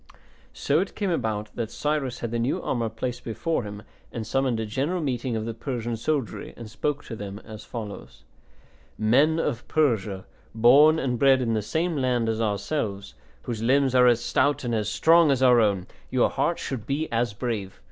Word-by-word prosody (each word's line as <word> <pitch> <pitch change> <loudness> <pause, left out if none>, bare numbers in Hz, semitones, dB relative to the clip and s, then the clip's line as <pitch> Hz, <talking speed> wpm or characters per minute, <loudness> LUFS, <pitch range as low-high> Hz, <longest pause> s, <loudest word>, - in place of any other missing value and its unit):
So 145 +2 +1
it 190 - -3
came 200 -3 -1
about 110 -9 -2
that 115 -2 -3
Cyrus 145 -4 -2
had 115 - -3
the 120 - -1
new 120 +3 0
armour 115 -3 -1
placed 120 +3 -5
before 160 +8 -2
him 105 -1 -8 0.3
and 115 -2 -5
summoned 130 0 0
a 110 - -2
general 140 +12 -1
meeting 130 -5 -2
of 110 0 -2
the 115 - -3
Persian 120 -1 -4
soldiery, 130 +1 -3
and 115 - -8
spoke 145 +6 -2
to - - -6
them 100 -2 -7
as 110 -1 -10
follows: 110 -4 -8 0.7
"Men 140 +9 +3
of 140 -7 -2
Persia, 110 -11 0 0.3
born 140 +8 +6
and 125 -5 -1
bred 135 -1 +5
in 115 -3 0
the 110 - 0
same 160 - -1
land 125 -4 +1
as 110 0 -1
ourselves, 100 -1 -2 0.3
whose 115 -3 -4
limbs 130 +2 +3
are 125 -1 +6
as 120 -1 +3
stout 145 +2 +1
and 120 -1 -2
as 105 -2 0
strong 165 +6 +5
as 135 -2 +2
our 125 -2 +6
own, 100 -4 +1 0.2
your - - +2
hearts - - -1
should 125 -6 -5
be 150 +3 -1
as 115 -2 0
brave. 105 -5 -4
120 Hz, 190 wpm, -25 LUFS, 110-140 Hz, 0.7 s, born